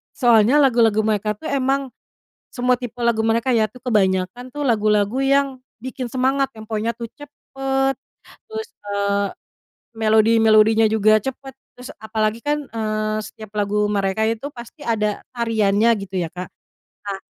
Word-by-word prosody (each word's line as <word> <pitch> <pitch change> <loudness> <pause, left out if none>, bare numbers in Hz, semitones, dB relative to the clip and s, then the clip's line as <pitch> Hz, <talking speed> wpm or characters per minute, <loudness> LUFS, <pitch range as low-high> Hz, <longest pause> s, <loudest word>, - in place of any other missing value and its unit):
Soalnya 235 +1 +4
lagu-lagu 230 -5 +3
mereka 210 -1 0
tuh 315 - -8
emang, 270 -1 0 0.6
semua 250 0 +1
tipe 245 -1 -7
lagu 230 -2 +2
mereka 230 +3 +1
ya 215 -1 +3
tuh, 250 - -14
kebanyakan 205 +1 0
tuh 295 +1 -4
lagu-lagu 210 +1 +2
yang 275 +1 +3 0.3
bikin 255 0 -6
semangat, 265 +1 +1
temponya 220 +1 -3
tuh 235 -1 -6
cepat, 270 -2 -3 0.5
terus, 440 0 -6 0.3
eee, 200 0 +1 0.7
melodi-melodinya 220 0 +4
juga 215 0 +4
cepat. 265 +1 -6 0.2
Terus 250 +2 -10
apalagi 220 0 -1
kan, 295 -1 -1
eee, 215 -1 -2
setiap 215 -1 -11
lagu 210 0 +1
mereka 200 +1 0
itu 230 +5 -2
pasti 240 +5 -11
ada 210 -3 -1
tariannya 220 -2 +2 0.2
gitu 190 0 -10
ya, 170 - -1
Kak. 180 +1 -7 0.6
Nah 195 -1 -3
225 Hz, 140 wpm, -21 LUFS, 215-255 Hz, 0.7 s, Soalnya